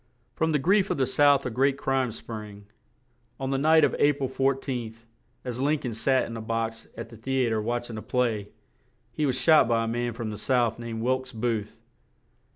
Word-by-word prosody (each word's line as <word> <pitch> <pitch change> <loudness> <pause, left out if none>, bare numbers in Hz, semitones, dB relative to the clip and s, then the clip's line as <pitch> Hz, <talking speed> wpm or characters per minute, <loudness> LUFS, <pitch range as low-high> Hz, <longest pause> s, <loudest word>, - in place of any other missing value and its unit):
From 160 0 0
the 150 - +3
grief 190 +7 +2
of - - -1
the 135 - +2
South 145 0 +4
a 125 - -2
great 135 +4 +2
crime 135 -3 0
sprang; 105 -2 -9 0.7
on 135 0 -2
the 135 - 0
night 160 +2 +5
of - - -1
A 145 0 +5
pril 135 -2 -4
14th, 130 -4 -2 0.4
as 125 0 -4
Lin 150 +3 +2
coln 125 -5 -5
sat 130 +4 +2
in 115 - -7
a 115 - -5
box 115 0 -3
at - - -6
the 115 - -12
the 130 +3 0
a - - 0
tre 110 - +1
watch 120 +2 -2
ing 110 -2 -6
a - - -8
play 115 -5 -1 0.6
he 150 +5 -1
was 130 -1 0
shot 155 -6 +5
by 115 -1 +2
a - - -2
man 120 +1 -2
from 115 -1 -4
the 105 - -7
South 120 -3 +1
named 115 -1 -5
Wilkes 130 +1 -1
Booth. 110 -2 -2
125 Hz, 215 wpm, -26 LUFS, 115-135 Hz, 0.7 s, night